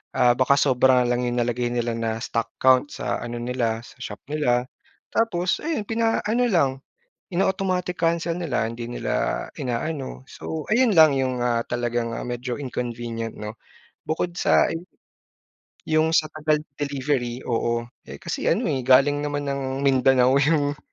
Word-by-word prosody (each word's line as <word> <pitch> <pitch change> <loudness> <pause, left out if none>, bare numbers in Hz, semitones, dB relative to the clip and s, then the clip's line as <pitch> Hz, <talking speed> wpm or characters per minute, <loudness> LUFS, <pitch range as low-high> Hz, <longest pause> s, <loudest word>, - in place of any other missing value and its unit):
ah, 120 - +5
baka 140 +2 +4
sobra 130 -2 +4
lang 125 0 0
yung 120 0 -1
nalagay 120 +1 0
nila 120 -1 -1
na 115 -1 -2
stock 115 -1 -2
count 130 +2 +4
sa - - -2
ano 120 0 -5
nila, 120 -2 -1
sa - - -15
shop 105 - -7
nila. 125 -5 +1 0.4
Tapos 185 -6 +1
ayun 310 -8 -1
pina-ano 225 +1 +1
lang, 170 - +3 0.6
in-automatic 185 -1 0
cancel 165 0 0
nila, 145 -10 -1
hindi 115 0 -6
nila 120 - -2
inaano. 130 +2 -3
So 160 -2 -5
ayun 235 -2 +4
lang 160 -2 +8
yung, 130 -2 -1
ah, 120 -1 +1
talagang, 120 -1 -1
ah, - - -5
medyo 120 0 -4
inconvenient 120 -4 -4
'no? 105 +1 -7 0.5
Bukod 170 +2 -2
sa, - - +4
eh - - -2 1.1
yung 160 +1 +2
sa 155 -2 +2
tagal 155 -1 0
ng 140 -2 -32
delivery 135 -3 -2
oo, 115 0 0 0.2
eh, - - -9
kasi - - -3
ano, - - +2
eh, 130 -2 -2
galing 135 +2 +5
naman 145 0 -2
ng 135 0 -3
Mindanao 130 -1 +4
yung, 145 0 +2
130 Hz, 155 wpm, -24 LUFS, 120-155 Hz, 1.1 s, lang